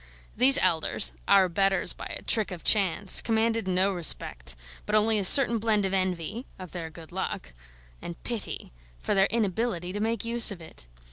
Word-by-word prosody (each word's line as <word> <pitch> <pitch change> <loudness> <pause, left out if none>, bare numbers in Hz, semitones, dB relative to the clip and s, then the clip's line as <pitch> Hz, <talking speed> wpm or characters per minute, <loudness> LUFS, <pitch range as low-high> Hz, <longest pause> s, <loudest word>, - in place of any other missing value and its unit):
These 265 +4 +5
elders, 155 - 0
our 190 -2 +4
betters 195 +2 0
by - - -9
a - - -9
trick 220 -3 0
of 180 -3 -10
chance, 195 -2 +3
commanded 225 -2 -2
no 190 +2 0
respect, 60 - -2 0.3
but 210 - -1
only 215 0 +1
a - - -3
certain 235 +3 +6
blend 215 -2 -1
of 190 - -4
envy 185 - -4
of 185 -3 -11
their 165 -3 -7
good 160 0 -15
luck 185 - -6 0.5
and 170 - -10
pity 235 - -7 0.2
for - - -4
their 195 -1 +2
inability 205 -4 -3
to 205 - -5
make 225 +2 -3
use 235 0 +5
of 195 - -9
it. 160 - -14
195 Hz, 180 wpm, -25 LUFS, 175-225 Hz, 0.5 s, certain